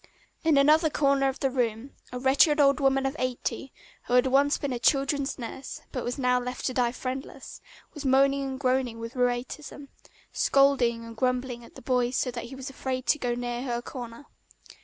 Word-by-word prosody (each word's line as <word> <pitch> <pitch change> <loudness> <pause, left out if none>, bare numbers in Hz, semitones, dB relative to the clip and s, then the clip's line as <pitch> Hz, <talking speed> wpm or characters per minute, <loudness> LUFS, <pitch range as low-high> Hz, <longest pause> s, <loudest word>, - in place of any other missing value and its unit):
In 320 -3 +4
another 305 +3 +5
corner 275 -2 +2
of 265 - -6
the 270 - +1
room 245 0 -2 0.2
a 250 - -4
wretched 275 +4 +4
old 280 0 +4
woman 270 -1 +2
of 270 +2 -1
eighty, 255 +1 -3 0.4
who 245 - +1
had 250 - +5
once 280 +2 +3
been 280 -3 -3
a 240 - -3
children's 275 +2 +1
nurse 260 +2 -7
but 250 - -4
was 245 - -3
now 250 -2 +2
left 250 0 -5
to 255 - 0
die 245 -1 +1
friendless, 260 +2 -7 0.3
was 295 - -8
moaning 275 +1 +3
and 265 -1 -5
groaning 255 -3 0
with 230 +2 -7
rheumatism, 250 +3 -3 0.4
scolding 255 -4 +3
and 230 0 -10
grumbling 250 -1 -1
at - - -16
the - - -12
boy 250 -1 +1
so 250 0 -1
that 240 -1 -6
he 265 - -9
was 265 0 -7
afraid 260 -1 -4
to 300 - +2
go 245 -2 -1
near 240 0 -3
her 240 -2 -2
corner. 240 +1 -8
260 Hz, 195 wpm, -27 LUFS, 245-275 Hz, 0.4 s, another